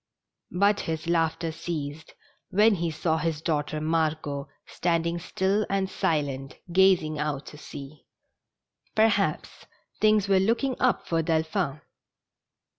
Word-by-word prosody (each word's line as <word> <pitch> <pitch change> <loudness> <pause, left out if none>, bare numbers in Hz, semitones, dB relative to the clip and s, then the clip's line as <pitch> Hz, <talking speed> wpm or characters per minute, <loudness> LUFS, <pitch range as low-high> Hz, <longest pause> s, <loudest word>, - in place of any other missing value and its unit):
But 200 +3 +2
his 160 0 -3
laughter 165 -1 0
ceased 160 -2 -5 0.3
when 210 +3 +5
he 170 -3 -1
saw 160 +1 0
his 160 -2 -1
daughter 155 -1 -1
Margot 155 -3 -1 0.2
stand 170 -1 0
ing 170 +1 -1
still 190 +4 0
and 195 -1 +1
silent, 145 -8 -2 0.2
gazing 180 -5 +4
out 150 -2 -2
to - - -10
sea. 145 0 -10 0.9
Perhaps 205 -7 +1 0.3
things 215 -2 +4
were 195 -1 +4
looking 235 +7 +1
up 255 -1 +2
for 165 -1 +1
Delphi 160 0 0
n. 150 - -17
165 Hz, 125 wpm, -27 LUFS, 155-190 Hz, 0.9 s, when